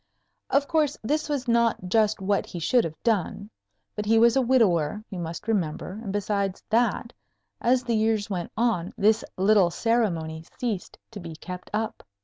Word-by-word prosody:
Of 280 0 +2
course, 305 -3 +1
this 300 +7 -1
was 275 -3 -2
not 235 -5 +2
just 215 +2 +2
what 200 +1 0
he - - -7
should 230 +9 +2
have 160 -1 -5
done; 210 -1 -1 0.4
but 210 -1 -4
he 225 +1 +4
was 235 +2 +5
a 270 - +4
widower, 210 - +2
you 185 - -5
must 170 +3 -6
remember, 190 -1 -2
and 200 - -4
besides 200 -1 -1
that, 235 +1 +1 0.5
as 250 +1 +3
the 235 -2 0
years 220 -1 +1
went 180 -4 -4
on 220 -7 0
this 215 +2 +3
little 195 -1 +4
ceremony 170 -8 0
ceased 220 -7 -3
to 215 - -8
be 165 -3 -8
kept 180 +2 -8
up. 220 +1 -2
215 Hz, 170 wpm, -26 LUFS, 185-235 Hz, 0.5 s, was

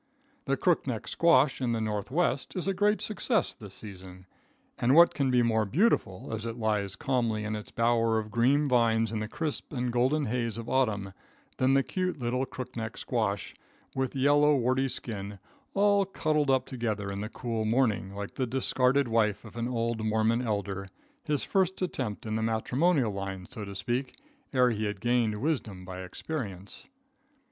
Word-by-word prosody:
The 140 0 +1
crook 175 0 +2
neck 115 -4 -3
squash 145 -5 +3
in 120 -2 +1
the 115 - 0
Northwest 110 - -1
is 180 0 -2
a 195 - +2
great 205 +2 +2
success 220 +1 +1
this 105 -6 -11
season. 95 -3 -10 0.5
And 125 +4 +3
what 170 +1 +7
can 140 -2 0
be 125 -1 +4
more 110 -1 +2
beautiful, 115 - +1
as 110 -1 -3
it 115 -1 -4 0.4
calmly 115 -5 0
lies - - -3
in 110 - -2
its 105 - -7
bower 115 -1 +2
of 110 -1 -3
green 135 +6 +3
vines 115 -3 +3
in 110 - -2
the 110 - -3
crisp 155 +6 -4
and 125 -3 -2
golden 130 +5 +2
haze 115 -1 -2
of 115 0 -6
autumn, 105 -8 0 0.4
than 130 +1 +3
the 135 - +4
cute 185 +2 -2
little 125 +1 -1
crook 130 0 -7
neck 115 0 -4
squash, 110 -5 -2 0.4
with 130 -1 -1
yellow, 145 +2 +4
warty 130 +1 +1
skin, 105 -5 -5 0.4
all 200 0 +4
cuddled 155 -6 0
up 130 -1 +3
together 110 -5 -3
in 100 0 -4
the 105 - -4
cool 115 -2 -3
morning, 110 -4 +1
like 100 0 -5
the 130 - -1
discarded 130 +2 +2
wife 110 -2 +1
of 110 - -12
an 120 0 -2
old 115 -2 -1
Mormon 110 +2 +2
elder 100 -4 -2 0.4
his 150 -2 0
first 190 -1 +1
attempt 130 - -3
in 110 0 -2
the - - -1
matrimonial 125 +4 +1
line, 95 -1 -5
so 115 -5 -7
to 100 0 -8
speak, 120 +7 -2 0.4
ere 125 -2 +4
he 110 -1 -2
had 105 -1 -3
gained 120 -2 +1
wisdom 110 -9 -2
by 95 0 -7
experience. 100 - -6
120 Hz, 180 wpm, -29 LUFS, 110-135 Hz, 0.5 s, what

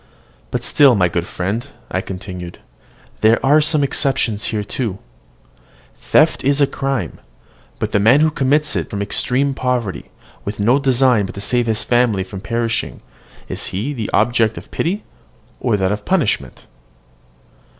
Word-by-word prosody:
"But - - -3
still, 140 -4 +5
my 90 -3 +3
good 85 +1 -2
friend," 105 +8 -3 0.2
I 95 - 0
continued, 90 -2 -7 0.6
"there 110 +1 +4
are 150 +3 +5
some 150 -1 +2
exceptions 130 -6 0
here 105 -2 -1
too. 105 -2 -3 1.0
Theft - - +2
is 140 +2 +2
a 140 - +6
crime; 135 -1 -3 0.6
but - - -3
the 100 - +2
man 115 +8 +5
who 155 0 +3
commits 150 +2 +1
it - - -2
from 100 -2 -3
extreme 130 +7 0
poverty, 125 -7 -2 0.3
with 100 +1 -5
no 120 +7 +3
design 130 -6 +3
but - - -9
to 100 - -6
save 120 +3 0
his 110 -1 0
family 120 -5 +2
from 95 0 -9
perishing, 115 +2 -2 0.5
is - - -4
he 105 +10 -3
an - - -4
object 110 -1 +2
of - - -10
pity, 190 +6 -2 0.6
or - - +1
of 100 +1 -1
punishment? 180 - -1
115 Hz, 150 wpm, -18 LUFS, 100-135 Hz, 1.0 s, a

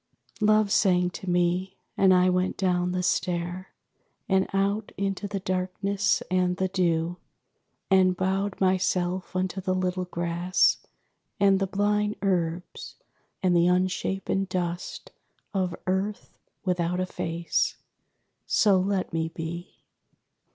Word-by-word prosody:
_Love 215 -1 +4
sang 180 -3 +3
to 190 - -6
me. 180 +2 0 0.2
And 190 -1 +5
I 180 0 +5
went 185 0 +1
down 180 -1 +1
the 180 0 -1
stair, 175 +1 -1 0.6
And 190 -1 +2
out 200 +2 0
into 195 0 -2
the 200 -1 -4
darkness 190 +1 0
and 180 -1 +1
the 190 0 0
dew; 175 -2 0 0.7
And 185 -1 +4
bowed 190 +1 -1
myself 185 -1 0
unto 185 +1 -1
the 185 0 0
little 185 0 -1
grass, 175 +1 +1 0.6
And 195 -1 +4
the 195 - 0
blind 210 +2 0
herbs, 175 -3 -2 0.5
and 180 -1 +3
the 170 0 +4
unshapen 185 +1 0
dust 180 -2 -4 0.4
Of 185 -3 -1
earth 190 +3 -2 0.3
without 180 -1 0
a 185 - +1
face. 170 -1 -1 0.7
So 200 -3 +4
let 190 -1 -1
me 160 0 -1
be. 170 +2 -7
185 Hz, 125 wpm, -26 LUFS, 180-195 Hz, 0.7 s, And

